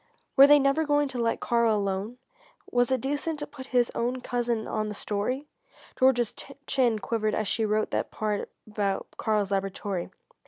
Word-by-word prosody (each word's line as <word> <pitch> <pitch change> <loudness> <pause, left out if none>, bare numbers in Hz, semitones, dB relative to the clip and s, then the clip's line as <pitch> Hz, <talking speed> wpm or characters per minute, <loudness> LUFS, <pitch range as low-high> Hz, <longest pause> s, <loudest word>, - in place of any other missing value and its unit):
Were 275 0 +9
they 295 0 +8
never 275 +3 +2
going 290 -1 +2
to 255 -2 -4
let 230 -1 0
Karl 235 -2 +2
alone? 200 +3 -2 0.5
Was 245 +1 +2
it 260 -2 +1
decent 290 +4 -2
to 295 - -4
put 280 -3 -11
his 245 -2 +2
own 245 +2 -1
cousin 240 -2 -1
on 215 0 -1
the 210 - -5
story? 215 +9 -2 0.5
Georgia's 245 -3 +3 0.3
chin 250 -5 +2
quivered 215 0 -1
as 215 - -1
she 225 +2 0
wrote 215 +1 0
that - - -1
part 210 -1 -2 0.2
about 205 -2 -2
Karl's 210 -3 0
laboratory. 195 -1 -2
235 Hz, 170 wpm, -27 LUFS, 210-260 Hz, 0.5 s, Were